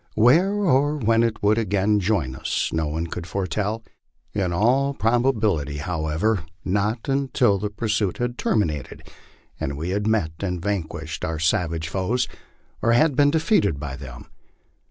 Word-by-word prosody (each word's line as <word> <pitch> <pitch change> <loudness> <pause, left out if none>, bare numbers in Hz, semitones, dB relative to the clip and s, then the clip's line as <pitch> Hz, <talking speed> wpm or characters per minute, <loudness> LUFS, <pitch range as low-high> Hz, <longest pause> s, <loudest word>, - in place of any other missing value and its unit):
Where 145 - +5
or 150 -7 +2
when 115 -3 +3
it 115 -3 -1
would 105 +2 +4
again 105 0 +1
join 90 -10 0
us - - -2
no 80 -1 0
one 80 +3 -2
could 85 +1 -6
foretell; 100 +4 -2 0.5
in 95 -4 0
all 130 +9 +2
probability, 110 - +1
however, 80 +5 -1 0.2
not 105 +4 -1
until 130 -6 +2
the 105 +1 -2
pursuit 105 -2 -1
had 120 0 -2
terminated 75 - -1 0.5
and 70 0 -3
we 85 +4 -3
had 105 +2 -1
met 110 -8 +1
and 90 -3 -2
vanquished 80 -5 -4
our 80 0 -2
savage 80 0 0
foes, 100 +9 0 0.5
or 115 - +3
had 145 +4 +4
been 145 +1 +5
defeated 155 - +2
by 70 -2 -5
them. 65 -3 -10
105 Hz, 150 wpm, -23 LUFS, 80-115 Hz, 0.5 s, Where